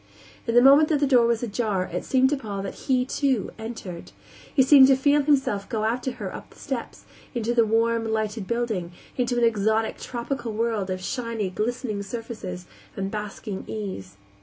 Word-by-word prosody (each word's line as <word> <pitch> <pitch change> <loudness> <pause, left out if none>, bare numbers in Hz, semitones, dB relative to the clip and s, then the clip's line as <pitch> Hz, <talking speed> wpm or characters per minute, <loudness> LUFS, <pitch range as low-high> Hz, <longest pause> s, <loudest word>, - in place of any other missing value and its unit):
In 230 - 0
the 245 - +7
moment 280 +3 +7
that 305 -3 +2
the 290 - +3
door 250 -4 +5
was 235 0 0
ajar 215 -4 -1
it - - -2
seemed 265 0 +3
to - - +3
Paul 205 -7 -5
that 195 - -5 0.2
he, 255 -1 +3
too, 265 -4 0
entered. 220 -6 -7 0.4
He 265 - +4
seemed 265 0 +8
to 270 - +6
feel 285 +2 +3
himself 270 -9 +1
go 220 -2 -2
after 245 +3 -1
her 205 -6 -6
up - - -9
the - - -20
steps, 265 -5 -6 0.3
into 235 0 0
the 230 -2 +3
warm, 230 +1 +2
lighted 215 -2 -2
building, 220 -8 -2 0.2
into 245 -1 0
an 240 - +2
exotic, 220 0 +1
tropical 240 -1 -4
world 220 -3 -1
of 185 0 -3
shiny, 230 -4 -3
glistening 215 0 -2
surfaces 200 -4 -6 0.3
and 195 0 -3
basking 210 -1 -5
ease. 190 - -6
230 Hz, 185 wpm, -25 LUFS, 210-250 Hz, 0.4 s, seemed